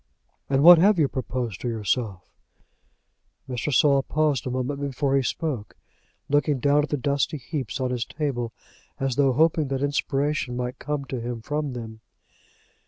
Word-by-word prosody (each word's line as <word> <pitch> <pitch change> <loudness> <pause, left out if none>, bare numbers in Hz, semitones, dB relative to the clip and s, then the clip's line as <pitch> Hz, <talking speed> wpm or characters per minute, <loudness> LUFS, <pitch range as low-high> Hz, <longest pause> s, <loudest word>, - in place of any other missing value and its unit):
"And 135 0 +2
what 175 0 +10
have 200 +3 +5
you 155 -4 +3
proposed 125 -6 -4
to - - -3
yourself?" 110 -3 -2 1.2
Mr. 125 +3 -3
Saul 140 +1 +4
paused 145 -2 0
a - - -1
moment 130 +3 -2
before 140 0 0
he 135 - +3
spoke, 130 -5 -3 0.5
looking 145 0 +2
down 145 +3 +3
at 150 - -3
the 145 - 0
dusty 140 +3 0
heaps 130 -4 -4
upon 130 -2 -1
his 120 -1 -2
table, 130 -6 -3 0.5
as 135 -2 -1
though 135 -1 +3
hoping 155 +1 +2
that 135 0 -2
inspiration 145 -2 -1
might 125 0 -4
come 145 0 -3
to 130 -2 -5
him 120 0 -4
from 150 0 -2
them. 110 -2 -7
135 Hz, 165 wpm, -25 LUFS, 125-145 Hz, 1.2 s, what